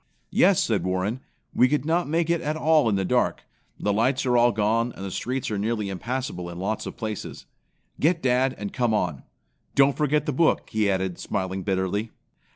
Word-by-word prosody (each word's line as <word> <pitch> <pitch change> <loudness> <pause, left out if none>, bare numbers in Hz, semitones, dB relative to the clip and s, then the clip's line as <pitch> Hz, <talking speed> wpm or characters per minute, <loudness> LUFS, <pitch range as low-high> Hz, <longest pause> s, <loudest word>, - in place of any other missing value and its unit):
"Yes," - - +4
said - - 0
Warren, 95 +6 -1 0.3
"we 125 - +5
could 145 -2 0
not 165 0 +1
make 165 +1 +1
it 170 -1 +1
at 150 -1 -2
all 155 -5 +3
in 105 - +1
the 95 -1 0
dark. - - +1 0.4
The 105 - 0
lights 125 +6 +1
are 125 -1 +2
all 120 0 +5
gone, 110 +3 +1
and 95 - -7
the 95 - -5
streets 125 +5 -3
are 105 - -1
nearly 105 -1 -1
impassable 100 -3 -4
in 85 - -8
lots 100 +4 -3
of - - -8
places. 110 -3 -5 0.5
Get 165 +3 +2
dad, 130 +1 +2
and 105 -1 -5
come 120 -4 +1
on. 85 -9 -1 0.5
Don't 140 0 +5
forget 150 0 +1
the 150 - -1
book," 160 +5 +1
he 110 -2 +1
added, 95 -2 -1
smiling 95 -1 -3
bitterly. 95 +3 -1
115 Hz, 195 wpm, -25 LUFS, 100-135 Hz, 0.5 s, we